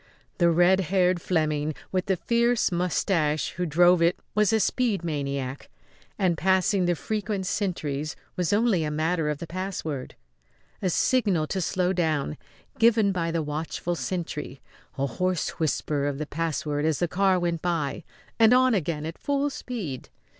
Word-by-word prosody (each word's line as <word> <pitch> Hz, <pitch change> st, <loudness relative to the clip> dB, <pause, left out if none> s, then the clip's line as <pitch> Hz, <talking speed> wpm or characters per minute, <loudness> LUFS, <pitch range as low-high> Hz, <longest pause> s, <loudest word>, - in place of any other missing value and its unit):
The 170 Hz, -1 st, +5 dB
red 175 Hz, +3 st, +4 dB
haired 180 Hz, -1 st, +2 dB
Fleming 155 Hz, -3 st, 0 dB, 0.2 s
with 185 Hz, -1 st, -1 dB
the 190 Hz, -, +2 dB
fierce 235 Hz, +4 st, +1 dB
moustache 170 Hz, -3 st, 0 dB
who 180 Hz, +1 st, -3 dB
drove 175 Hz, +3 st, +5 dB
it 170 Hz, +1 st, +3 dB, 0.2 s
was 210 Hz, -2 st, +3 dB
a 220 Hz, -, +3 dB
speed 215 Hz, -2 st, 0 dB
maniac, 140 Hz, -4 st, -3 dB, 0.5 s
and 180 Hz, -4 st, +1 dB
passing 190 Hz, +1 st, +2 dB
the 175 Hz, 0 st, +2 dB
frequent 210 Hz, +1 st, -3 dB
sentries 160 Hz, -7 st, -2 dB, 0.2 s
was 180 Hz, 0 st, 0 dB
only 205 Hz, -5 st, +2 dB
a 150 Hz, -, -1 dB
matter 155 Hz, +1 st, 0 dB
of 150 Hz, -, -1 dB
the 170 Hz, -, -6 dB
password. 170 Hz, -6 st, -5 dB, 0.7 s
A 185 Hz, -, +1 dB
signal 195 Hz, -5 st, +2 dB
to 190 Hz, +4 st, -2 dB
slow 180 Hz, +1 st, 0 dB
down, 155 Hz, -4 st, 0 dB, 0.4 s
given 225 Hz, -3 st, +4 dB
by 170 Hz, -3 st, -1 dB
the 165 Hz, -1 st, -1 dB
watchful 155 Hz, +3 st, -3 dB
sentry, 150 Hz, -3 st, -4 dB, 0.4 s
a 135 Hz, -, +1 dB
hoarse 180 Hz, +7 st, -1 dB
whisper 145 Hz, -2 st, 0 dB
of 140 Hz, -1 st, -2 dB
the 155 Hz, -, -3 dB
password 150 Hz, -2 st, -2 dB
as 155 Hz, -2 st, +1 dB
the 175 Hz, -, 0 dB
car 190 Hz, +2 st, +2 dB
went 170 Hz, -2 st, -1 dB
by, 170 Hz, -2 st, -1 dB, 0.4 s
and 225 Hz, +2 st, +7 dB
on 255 Hz, -1 st, +4 dB
again 160 Hz, -5 st, -1 dB
at 165 Hz, +1 st, -6 dB
full 285 Hz, 0 st, 0 dB
speed. 200 Hz, -, -6 dB
175 Hz, 160 wpm, -26 LUFS, 155-190 Hz, 0.7 s, and